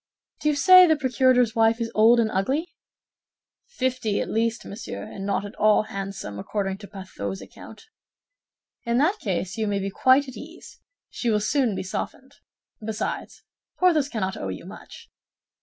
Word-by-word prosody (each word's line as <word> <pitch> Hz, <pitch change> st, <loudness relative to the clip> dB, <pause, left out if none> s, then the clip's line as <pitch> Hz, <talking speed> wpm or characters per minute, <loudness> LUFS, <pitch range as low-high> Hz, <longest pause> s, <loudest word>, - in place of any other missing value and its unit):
"Do 300 Hz, -, +1 dB
you 300 Hz, -, +1 dB
say 365 Hz, +4 st, +8 dB
the 315 Hz, -, +4 dB
procurator's 255 Hz, -3 st, +2 dB
wife 225 Hz, 0 st, +3 dB
is 230 Hz, -1 st, -3 dB
old 230 Hz, +3 st, +5 dB
and 220 Hz, -2 st, +1 dB
ugly?" 265 Hz, -, 0 dB, 1.0 s
"Fifty 255 Hz, -, -1 dB
at -, -, -3 dB
least, 230 Hz, +1 st, -1 dB
monsieur, 200 Hz, -, -7 dB
and 195 Hz, 0 st, -7 dB
not 200 Hz, 0 st, -1 dB
at 205 Hz, -, -8 dB
all 215 Hz, 0 st, +4 dB
handsome, 195 Hz, -, -6 dB
according 195 Hz, -, -3 dB
to 205 Hz, -, -10 dB
Pathaud's 190 Hz, -1 st, -6 dB
account." 450 Hz, -, -13 dB, 1.0 s
"In 235 Hz, 0 st, 0 dB
that 335 Hz, +10 st, +2 dB
case, 190 Hz, 0 st, -3 dB
you 220 Hz, -1 st, -1 dB
may 200 Hz, -1 st, 0 dB
be 195 Hz, 0 st, -3 dB
quite 260 Hz, +7 st, +4 dB
at 260 Hz, -, -9 dB
ease; 325 Hz, +3 st, -12 dB, 0.3 s
she 240 Hz, -, -2 dB
will 210 Hz, -1 st, +2 dB
soon 230 Hz, 0 st, +1 dB
be -, -, -3 dB
softened. 265 Hz, +8 st, -6 dB, 0.5 s
Besides, 220 Hz, 0 st, -4 dB, 0.3 s
Porthos 320 Hz, -6 st, +3 dB
cannot 190 Hz, -6 st, -2 dB
owe -, -, -5 dB
you 95 Hz, -, -7 dB
much." -, -, -12 dB
225 Hz, 165 wpm, -24 LUFS, 200-265 Hz, 1.0 s, say